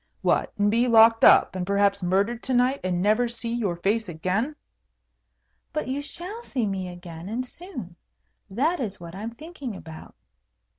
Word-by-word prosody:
"What, -, -, +2 dB
and 205 Hz, 0 st, +3 dB
be 235 Hz, +3 st, +3 dB
locked 225 Hz, -1 st, +6 dB
up, -, -, +7 dB
and 185 Hz, -, -2 dB
perhaps 200 Hz, +1 st, +2 dB
murdered 200 Hz, +6 st, +1 dB
to 260 Hz, -, -1 dB
night, 255 Hz, +3 st, +3 dB
and 180 Hz, -1 st, 0 dB
never 215 Hz, +4 st, +3 dB
see 235 Hz, 0 st, -5 dB
your 210 Hz, -7 st, -1 dB
face 205 Hz, +4 st, 0 dB
again?" 185 Hz, -, -1 dB, 1.2 s
"But 305 Hz, -, -2 dB
you 270 Hz, +2 st, -2 dB
shall 355 Hz, +9 st, -6 dB
see 260 Hz, -, -2 dB
me 190 Hz, -2 st, -2 dB
again, 175 Hz, 0 st, -9 dB
and 245 Hz, +4 st, -2 dB
soon. 255 Hz, -, -9 dB, 0.5 s
That 295 Hz, -, 0 dB
is 205 Hz, -6 st, -4 dB
what 170 Hz, -1 st, -9 dB
I 195 Hz, -, -7 dB
am 230 Hz, +2 st, -6 dB
thinking 285 Hz, -, -7 dB
about." 160 Hz, -3 st, -11 dB
220 Hz, 170 wpm, -25 LUFS, 185-255 Hz, 1.2 s, up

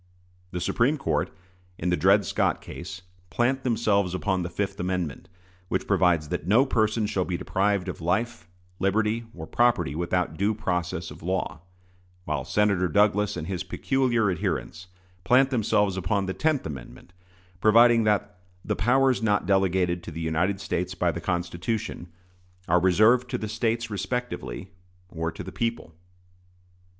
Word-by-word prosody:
The 90 Hz, -, -4 dB
Supreme 120 Hz, -, +1 dB
Court, 135 Hz, -, -1 dB, 0.5 s
in 90 Hz, +2 st, -1 dB
the -, -, +3 dB
Dred 100 Hz, +3 st, +4 dB
Scott -, -, 0 dB
case, 90 Hz, +1 st, -8 dB, 0.3 s
plant 130 Hz, +6 st, +1 dB
themselves 105 Hz, -7 st, +1 dB
upon 95 Hz, 0 st, 0 dB
the 85 Hz, -, -3 dB
fifth 100 Hz, +2 st, -3 dB
amendment, 90 Hz, -5 st, -3 dB, 0.4 s
which -, -, -1 dB
provides 85 Hz, -5 st, +2 dB
that 80 Hz, -, -3 dB
no 115 Hz, +8 st, +5 dB
person 110 Hz, -3 st, +1 dB
shall 100 Hz, -3 st, 0 dB
be 90 Hz, -1 st, -3 dB
deprived 100 Hz, 0 st, 0 dB
of 90 Hz, -, -5 dB
"life, 90 Hz, +1 st, -1 dB, 0.3 s
liberty, 110 Hz, +4 st, +1 dB
or 80 Hz, -2 st, -7 dB
property 120 Hz, -, +2 dB
without 85 Hz, 0 st, -1 dB
due 105 Hz, +3 st, +1 dB
process 90 Hz, -4 st, -2 dB
of -, -, -11 dB
law"; 90 Hz, -1 st, -2 dB, 0.6 s
while 75 Hz, -3 st, -2 dB
Senator 100 Hz, +1 st, +2 dB
Douglas 105 Hz, +3 st, +2 dB
and 80 Hz, -, -4 dB
his 90 Hz, 0 st, -3 dB
peculiar 120 Hz, -6 st, +1 dB
adherents 90 Hz, +1 st, -3 dB, 0.4 s
plant 130 Hz, +7 st, +4 dB
themselves 105 Hz, -5 st, +2 dB
upon 100 Hz, +1 st, 0 dB
the 95 Hz, -, -3 dB
tenth 155 Hz, +2 st, 0 dB
amendment, 75 Hz, +5 st, -9 dB, 0.5 s
providing 115 Hz, +2 st, +6 dB
that 105 Hz, -2 st, 0 dB, 0.3 s
"the -, -, 0 dB
powers 130 Hz, +5 st, +3 dB
not 105 Hz, -4 st, +1 dB
delegated 95 Hz, -2 st, +2 dB
to 85 Hz, -, -8 dB
the 85 Hz, 0 st, -7 dB
United 85 Hz, +5 st, 0 dB
States 90 Hz, 0 st, -3 dB
by 90 Hz, -1 st, +1 dB
the 85 Hz, -, -6 dB
Constitution" 90 Hz, +3 st, -3 dB, 0.6 s
"are 90 Hz, +1 st, +4 dB
reserved 110 Hz, +7 st, +4 dB
to 125 Hz, -, -1 dB
the 110 Hz, -, -4 dB
States 115 Hz, +1 st, -1 dB
respectively, 95 Hz, -, -4 dB, 0.4 s
or 80 Hz, -1 st, -3 dB
to -, -, -8 dB
the -, -, -8 dB
people." 115 Hz, -7 st, -3 dB
95 Hz, 150 wpm, -26 LUFS, 90-110 Hz, 0.6 s, providing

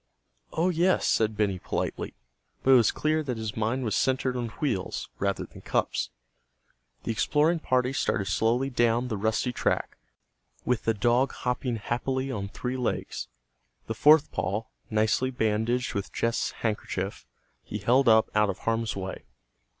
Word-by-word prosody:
"Oh, 170 Hz, +3 st, +1 dB
yes," 180 Hz, +2 st, +2 dB
said 110 Hz, -1 st, +2 dB
Benny, 100 Hz, -3 st, +1 dB
politely. -, -, -3 dB, 0.5 s
But 135 Hz, -, +4 dB
it -, -, +9 dB
was 120 Hz, -4 st, +6 dB
clear 155 Hz, +1 st, +1 dB
that 130 Hz, -6 st, -3 dB
his 110 Hz, -2 st, -4 dB
mind 115 Hz, +4 st, 0 dB
was 110 Hz, -, 0 dB
centered 130 Hz, -1 st, +1 dB
on 120 Hz, -1 st, -2 dB
wheels 115 Hz, -11 st, -2 dB
rather 100 Hz, 0 st, -1 dB
than -, -, -14 dB
cups. -, -, -1 dB, 0.9 s
The -, -, -1 dB
exploring 155 Hz, +8 st, +2 dB
party 130 Hz, -3 st, +1 dB
started 115 Hz, -5 st, 0 dB
slowly 120 Hz, +7 st, +1 dB
down 120 Hz, 0 st, +2 dB
the 110 Hz, -, -1 dB
rusty 110 Hz, +4 st, 0 dB
track, -, -, -1 dB, 0.7 s
with 125 Hz, -2 st, 0 dB
the 115 Hz, -, +2 dB
dog 120 Hz, +5 st, +2 dB
hopping 125 Hz, -1 st, -2 dB
happily 130 Hz, +4 st, -2 dB
on 100 Hz, -5 st, -3 dB
three 125 Hz, +4 st, -4 dB
legs. 125 Hz, -, -2 dB, 0.6 s
The 115 Hz, -, -3 dB
fourth 150 Hz, +6 st, +5 dB
paw, 100 Hz, +4 st, -1 dB, 0.3 s
nicely 110 Hz, +4 st, +2 dB
bandaged 120 Hz, +2 st, 0 dB
with 100 Hz, -1 st, -3 dB
Jess' 115 Hz, +1 st, 0 dB
handkerchief, 105 Hz, -3 st, -3 dB, 0.3 s
he 105 Hz, -, -6 dB
held 120 Hz, +5 st, +3 dB
up 110 Hz, 0 st, +5 dB
out 105 Hz, -1 st, +3 dB
of 95 Hz, -, -2 dB
harm's 115 Hz, 0 st, -1 dB
way. 95 Hz, -1 st, -5 dB
120 Hz, 155 wpm, -27 LUFS, 110-130 Hz, 0.9 s, it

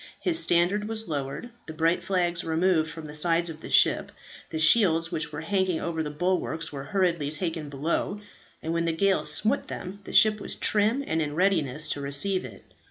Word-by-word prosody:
His 335 Hz, -2 st, +2 dB
standard 180 Hz, +5 st, +2 dB
was 220 Hz, -1 st, -3 dB
lowered, 145 Hz, -, -5 dB, 0.2 s
the 160 Hz, -, -8 dB
bright 165 Hz, +2 st, +1 dB
flags 175 Hz, -1 st, -1 dB
removed 160 Hz, 0 st, +1 dB
from 160 Hz, -1 st, -9 dB
the 150 Hz, -, -9 dB
sides 170 Hz, +2 st, +1 dB
of 160 Hz, 0 st, -12 dB
the -, -, -9 dB
ship, -, -, +3 dB, 0.4 s
the 160 Hz, -, -4 dB
shields 165 Hz, -1 st, +4 dB
which 160 Hz, -2 st, -2 dB
were 150 Hz, +1 st, -6 dB
hanging 185 Hz, 0 st, 0 dB
over 165 Hz, -1 st, -3 dB
the 150 Hz, -, -3 dB
bulwarks 165 Hz, +1 st, -2 dB
were 135 Hz, -1 st, -6 dB
hurriedly 170 Hz, -5 st, 0 dB
taken 160 Hz, -2 st, -3 dB
below, 160 Hz, +8 st, -2 dB, 0.4 s
and 160 Hz, -, -2 dB
when 170 Hz, 0 st, 0 dB
the 165 Hz, -, 0 dB
gale 195 Hz, +1 st, +2 dB
smote 220 Hz, -, 0 dB
them, 190 Hz, +2 st, -7 dB
the -, -, -9 dB
ship 215 Hz, -1 st, +6 dB
was -, -, -5 dB
trim, 215 Hz, +6 st, +1 dB
and 160 Hz, 0 st, -1 dB
in 145 Hz, -1 st, -3 dB
readiness 160 Hz, -6 st, +1 dB
to 145 Hz, -, -2 dB
receive 145 Hz, +6 st, +1 dB
it. 110 Hz, -6 st, -12 dB
165 Hz, 195 wpm, -26 LUFS, 155-190 Hz, 0.4 s, ship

